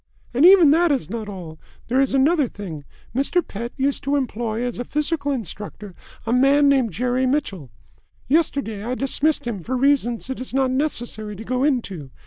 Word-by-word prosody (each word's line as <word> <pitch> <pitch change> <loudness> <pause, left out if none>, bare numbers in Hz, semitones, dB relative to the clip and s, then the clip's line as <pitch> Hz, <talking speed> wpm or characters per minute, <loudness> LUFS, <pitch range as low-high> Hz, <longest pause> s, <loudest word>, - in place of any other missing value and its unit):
"And 275 +8 +6
even 365 -6 +8
that 335 +1 +4
is 265 -8 -1
not 220 -2 -4
all. 170 -5 -8 0.3
There 255 +3 +2
is 275 - +1
another 290 +1 +3
thing. 170 -10 -8 0.3
Mr. 300 +6 +1
Pett 235 +4 -6
used 275 +1 0
to 280 +1 0
employ 235 -4 -2
as 245 -1 -4
a - - -1
physical 300 +2 -1
instructor 210 - -6 0.3
a 230 - 0
man 275 +3 +4
named 265 -5 +3
Jerry 250 +2 0
Mitchell. 200 - -2 0.6
Yesterday 275 -8 0
I 245 +3 -2
dismissed 280 +3 0
him 230 -5 -3
for 255 +9 -3
reasons 250 -4 +1
it 265 - -5
is 255 0 -5
not 265 -1 +2
necessary 240 -6 -3
to 215 - -8
go 255 +2 -1
into. 200 - -1
255 Hz, 180 wpm, -22 LUFS, 220-280 Hz, 0.6 s, even